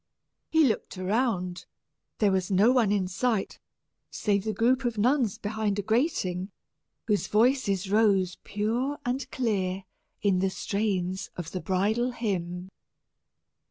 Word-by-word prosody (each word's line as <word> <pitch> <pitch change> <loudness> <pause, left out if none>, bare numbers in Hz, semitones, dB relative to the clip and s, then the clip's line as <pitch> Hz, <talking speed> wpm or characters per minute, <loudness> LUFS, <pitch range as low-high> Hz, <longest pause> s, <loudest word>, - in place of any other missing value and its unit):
He 320 0 +4
looked 220 -6 0
around; 185 -2 -1 0.5
there 205 -2 +3
was 190 -1 0
no 200 +5 +5
one 240 -6 +3
in 195 -3 +1
sight, 205 +2 -1 0.5
save 200 -1 0
the 220 - 0
group 245 +6 +2
of 240 -3 -1
nuns 240 -1 +2
behind 210 -1 -2
a 205 - -1
grating, 205 - 0 0.6
whose 210 -3 +1
voices 210 -4 +2
rose 200 -4 +3
pure 235 +7 -1
and 255 +2 -2
clear 195 -6 -1 0.4
in 195 -3 +3
the 190 +1 +2
strains 190 -2 -2
of 170 -2 -5
the 185 - -4
bridal 215 +6 0
hymn. 185 -5 -3
205 Hz, 130 wpm, -27 LUFS, 190-235 Hz, 0.6 s, no